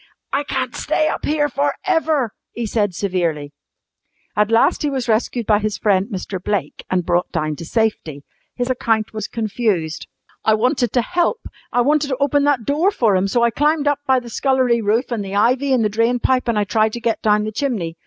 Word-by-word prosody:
"I 280 +1 +1
can't - - -3
stay 310 - 0
up - - -3
here 295 0 +1
for 285 +1 -1
ever," 305 -8 +1 0.2
he 235 - -3
said 205 -4 0
severely. 165 -7 -2 0.8
At 210 0 +2
last 230 0 +3
he 295 - 0
was 265 -3 -3
rescued 230 +1 0
by 210 -1 +3
his 210 -1 -2
friend 195 -2 +2
Mr. 190 -3 -5
Blake 195 -8 -2
and 180 -2 0
brought 175 0 0
down 155 -2 -1
to 165 - -7
safety. 165 -9 -1 0.3
His 245 -1 -2
account 225 -4 0
was 215 -1 -4
confused. 210 -8 -2 0.4
"I 220 - +4
wanted 245 +1 +1
to 245 - +2
help. 355 - 0 0.3
I 245 - +2
wanted 295 +3 +2
to 260 -2 -2
open 285 +1 +2
that 275 -6 +1
door 305 +7 +2
for 230 - +2
'em, 185 +1 +1
so 235 +4 +1
I 235 - +3
climbed 295 +3 +1
up 290 -1 +2
by 260 -1 +4
the 240 -1 -11
scullery 255 -2 +2
roof, 225 +5 0
an' 230 -3 -1
the 195 0 -5
ivy, 255 +6 +2
an' 250 -3 +3
the - - +3
drain 230 +2 +3
pipe, 255 0 +1
an' 230 - +1
I 210 - +2
tried 215 +1 +1
to 240 - -4
get 230 -1 -1
down 210 -1 +3
the 215 - -3
chimney. 210 -9 -2
230 Hz, 215 wpm, -20 LUFS, 205-265 Hz, 0.8 s, I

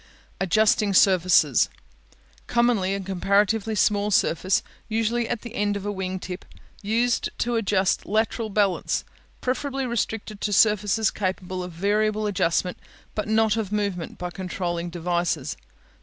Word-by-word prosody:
Adjusting 205 +2 +3
Surfaces 185 -2 +4 0.8
Commonly 235 -6 +2
a - - -3
comparatively 200 +3 +1
small 205 0 +2
surface, 190 -1 +2 0.3
usually 225 +1 0
at 235 - -2
the 235 -2 -9
end 205 -3 0
of 200 - -7
a 205 - -1
wing 190 -1 -3
tip, 180 0 -7 0.4
used 230 +3 +1
to 240 - -1
adjust 195 -4 +1
lateral 220 +1 0
balance; 200 -3 +1 0.4
preferably 270 +1 -2
restricted 225 -3 -3
to 210 - -1
surfaces 210 +1 +3
capable 185 -1 -3
of 180 0 -6
variable 210 +4 0
adjustment, 180 -2 0 0.3
but 210 - -3
not 220 0 +3
of 210 -3 -2
movement 200 -5 -2
by 180 0 -5
controlling 175 -2 -3
devices. 170 -4 -1
205 Hz, 130 wpm, -24 LUFS, 185-220 Hz, 0.8 s, Surfaces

